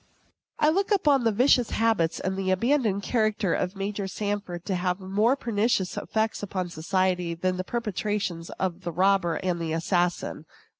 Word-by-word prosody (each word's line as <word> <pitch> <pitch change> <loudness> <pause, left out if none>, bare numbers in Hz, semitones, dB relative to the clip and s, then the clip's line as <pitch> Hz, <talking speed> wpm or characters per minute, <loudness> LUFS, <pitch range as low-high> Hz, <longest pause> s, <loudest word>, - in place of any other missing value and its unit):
I 300 - +4
look 385 +5 +1
upon 295 - +3
the 225 - +4
vicious 245 +2 +4
habits 220 -8 +1
and 190 0 -2
abandoned 215 0 +1
character 215 -5 +1
of 185 +2 -1
Major 200 0 -3
Sanford 200 -3 -4
to 195 - -1
have 180 0 -1
more 205 +7 +2
pernicious 220 -6 0
effects 220 -1 -1
on 185 -3 -3
society 180 +1 0
than 185 +2 -1
the 185 - -2
perpetrations 205 -5 -3
of 185 -1 -2
the 175 -1 -4
robber 185 -1 +2
and 175 0 -2
the 160 -1 -2
assassin. 175 +1 -1
195 Hz, 155 wpm, -26 LUFS, 180-220 Hz, -, I